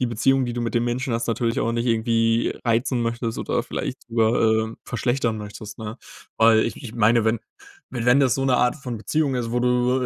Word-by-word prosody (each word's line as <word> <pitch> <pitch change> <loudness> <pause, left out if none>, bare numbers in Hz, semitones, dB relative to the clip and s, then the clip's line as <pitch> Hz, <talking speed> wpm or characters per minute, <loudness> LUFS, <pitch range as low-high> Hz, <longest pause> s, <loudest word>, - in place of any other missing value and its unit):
die 125 - +1
Beziehung, 130 +4 +2
die 120 - -3
du 120 - -3
mit 120 0 -3
dem 120 - +2
Menschen 120 +1 -2
hast, 115 - -2
natürlich 115 0 0
auch 115 - 0
nicht 115 +1 -1
irgendwie 115 0 +1
reizen 120 +1 +1
möchtest 115 0 -2
oder - - -1
vielleicht - - -5
drüber, 110 -1 +2
äh, - - -14
verschlechtern 120 -2 -1
möchtest, 105 0 -9
ne? 110 +2 -7 0.4
Weil, 110 0 +5
ich 115 - -3
ich 115 -3 -8
meine, 115 0 +3
wenn 110 0 +1 0.5
wenn 125 +2 +3
das 130 -3 +3
so 135 - -1
'ne 130 -2 +3
Art 125 +2 +2
von 125 -5 -6
Beziehung 145 +5 0
ist, 115 -2 -3
wo 120 - +1
du 125 +1 +2
120 Hz, 215 wpm, -23 LUFS, 115-125 Hz, 0.5 s, Weil